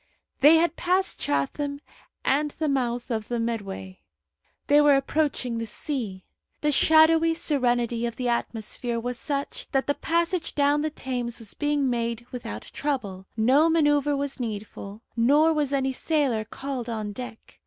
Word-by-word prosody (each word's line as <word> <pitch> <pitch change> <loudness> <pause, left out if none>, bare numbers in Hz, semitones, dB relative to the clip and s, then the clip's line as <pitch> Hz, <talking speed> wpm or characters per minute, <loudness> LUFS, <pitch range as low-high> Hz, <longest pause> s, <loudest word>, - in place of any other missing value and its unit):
They 295 +4 +8
had 335 +1 +2
passed 370 +2 +1
Chatham 280 - -1 0.5
and 295 +3 +2
the 315 - 0
mouth 245 -3 -1
of 220 -2 -2
the 240 -1 -2
Medway. 195 - -4 0.7
They 290 +1 +5
were 295 -1 +6
approaching 275 -4 0
the 230 - -4
sea. 215 - -4 0.4
The 295 - +2
shadowy 320 +2 +5
serenity 240 -6 0
of 235 - -5
the 250 +1 -2
atmosphere 235 0 -2
was 245 +1 -4
such 280 -1 -3
that 270 -1 +2
the 285 - +1
passage 340 +3 -1
down 290 0 +3
the 310 - 0
Thames 245 -5 -4
was 225 -4 -9
being 295 -2 0
made 235 -1 -2
without 165 - -6
trouble: 205 -10 -3
no 265 +9 +4
manoeuvre 295 -3 +3
was 280 -1 -3
needful, 215 -2 -6
nor 290 +7 +4
was 295 -3 0
any 265 -1 0
sailor 265 -7 0
called 260 0 -5
on 215 -2 -3
deck. 245 +1 -9
265 Hz, 155 wpm, -26 LUFS, 230-295 Hz, 0.7 s, They